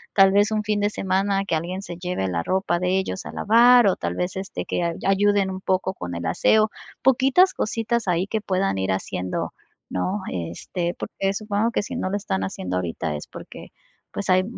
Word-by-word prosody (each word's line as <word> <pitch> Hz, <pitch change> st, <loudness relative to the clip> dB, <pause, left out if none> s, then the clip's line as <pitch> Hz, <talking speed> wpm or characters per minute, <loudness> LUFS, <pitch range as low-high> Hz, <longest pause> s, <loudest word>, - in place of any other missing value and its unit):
tal 195 Hz, -1 st, +7 dB
vez 205 Hz, +2 st, +3 dB
un 215 Hz, -1 st, 0 dB
fin 210 Hz, 0 st, 0 dB
de 205 Hz, +1 st, +1 dB
semana 195 Hz, +1 st, 0 dB
que 165 Hz, -, 0 dB
alguien 180 Hz, +4 st, -3 dB
se 175 Hz, -3 st, -8 dB
lleve 180 Hz, -, -2 dB
la 85 Hz, -2 st, -1 dB
ropa 190 Hz, -1 st, 0 dB
de 185 Hz, +1 st, +1 dB
ellos 190 Hz, 0 st, -4 dB
a -, -, -6 dB
lavar 235 Hz, +1 st, +6 dB
o 190 Hz, -, +3 dB
tal 85 Hz, 0 st, -3 dB
vez 180 Hz, -, -2 dB
este 190 Hz, 0 st, -5 dB
que 175 Hz, -, -1 dB, 0.2 s
ayuden 200 Hz, 0 st, +3 dB
un 190 Hz, 0 st, -6 dB
poco 190 Hz, 0 st, 0 dB
con 90 Hz, 0 st, -6 dB
el 85 Hz, 0 st, -4 dB
aseo. 215 Hz, -, +3 dB, 0.3 s
Poquitas 270 Hz, +9 st, +4 dB
cositas 225 Hz, 0 st, -1 dB
ahí 180 Hz, +2 st, +1 dB
que 220 Hz, 0 st, -2 dB
puedan 190 Hz, -, 0 dB
ir 95 Hz, 0 st, 0 dB
haciendo, 90 Hz, -1 st, -3 dB, 0.4 s
¿no?, 185 Hz, -, -2 dB
este, 95 Hz, -, -3 dB
porque 195 Hz, 0 st, -2 dB
supongo 215 Hz, +2 st, -1 dB
que 205 Hz, -, 0 dB
si -, -, -6 dB
no 185 Hz, -, -2 dB
lo 205 Hz, -, 0 dB
están 95 Hz, -, -2 dB
haciendo 90 Hz, -1 st, -3 dB
ahorita 85 Hz, -3 st, -3 dB
es 75 Hz, -, -7 dB
porque -, -, -11 dB, 0.4 s
pues 200 Hz, -, -5 dB
hay 185 Hz, 0 st, +5 dB
190 Hz, 200 wpm, -23 LUFS, 170-205 Hz, 0.4 s, tal